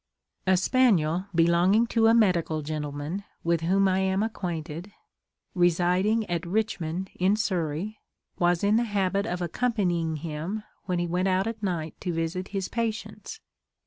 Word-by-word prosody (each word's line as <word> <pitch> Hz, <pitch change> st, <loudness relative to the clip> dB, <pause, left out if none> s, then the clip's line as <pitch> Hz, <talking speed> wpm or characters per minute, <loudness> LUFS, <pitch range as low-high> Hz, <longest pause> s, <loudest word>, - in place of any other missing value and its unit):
A 190 Hz, 0 st, +5 dB
spaniel 185 Hz, -5 st, +2 dB
belonging 175 Hz, +6 st, +4 dB
to 225 Hz, -1 st, +4 dB
a 225 Hz, -, +6 dB
medical 170 Hz, -8 st, +2 dB
gentleman, 150 Hz, +4 st, -4 dB, 0.2 s
with 170 Hz, -1 st, +1 dB
whom 195 Hz, +4 st, +3 dB
I 190 Hz, 0 st, +2 dB
am 190 Hz, +1 st, +1 dB
acquainted, 175 Hz, -4 st, -4 dB, 0.6 s
residing 180 Hz, +5 st, +2 dB
at 170 Hz, -1 st, -2 dB
Richmond 185 Hz, -2 st, -2 dB
in 190 Hz, +3 st, +2 dB
Surrey, 190 Hz, 0 st, -2 dB, 0.4 s
was 175 Hz, 0 st, +2 dB
in 205 Hz, +2 st, +4 dB
the 235 Hz, -, +2 dB
habit 200 Hz, -1 st, 0 dB
of 180 Hz, -3 st, -2 dB
accompanying 175 Hz, -5 st, 0 dB
him 165 Hz, +7 st, -4 dB, 0.2 s
when 180 Hz, -1 st, -1 dB
he 175 Hz, -, 0 dB
went 180 Hz, +2 st, 0 dB
out 190 Hz, +1 st, +2 dB
at 225 Hz, -1 st, -4 dB
night 170 Hz, -6 st, -2 dB
to 180 Hz, -, -2 dB
visit 165 Hz, +3 st, -2 dB
his 195 Hz, -2 st, -3 dB
patients. 230 Hz, -, -4 dB
185 Hz, 145 wpm, -27 LUFS, 170-205 Hz, 0.6 s, a